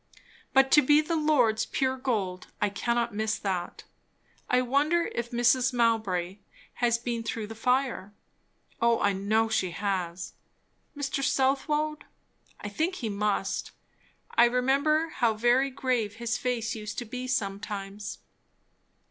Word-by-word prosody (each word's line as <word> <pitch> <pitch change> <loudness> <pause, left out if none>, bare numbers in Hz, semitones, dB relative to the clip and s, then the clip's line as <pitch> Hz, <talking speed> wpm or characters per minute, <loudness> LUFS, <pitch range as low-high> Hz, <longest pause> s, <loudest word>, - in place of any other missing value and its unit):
But 270 0 +4
to 300 - +8
be 295 +2 +5
the 310 +2 -1
Lord's 250 -9 +2
pure 260 -1 0
gold 210 -9 -2
I 210 - +1
cannot 235 +3 -1
miss 220 +1 -1
that. 185 -4 -3 0.7
I 250 0 +3
wonder 295 +7 +1
if 235 0 -3
Mrs. 245 +2 +2
Mowbray 210 -6 0 0.4
has 235 -1 +3
been 235 0 -3
through 225 -1 -4
the 220 - -8
fire? 250 -3 0 0.7
Oh 235 0 +3
I 205 - +2
know 215 +4 +1
she 220 -4 0
has. 180 -2 -3 0.6
Mr. 280 -1 -2
Southwode? 290 +3 0 0.6
I - - -5
think 320 - -1
he 235 -10 -4
must. 200 -1 -1 0.6
I 235 - +6
remember 275 +6 +2
how 235 -7 +1
very 240 +5 +3
grave 250 -6 -1
his 235 +1 -2
face 235 -3 -2
used 210 -2 -6
to 240 - -3
be 250 +3 -6
sometimes. 200 -3 -4
235 Hz, 135 wpm, -28 LUFS, 210-265 Hz, 0.7 s, to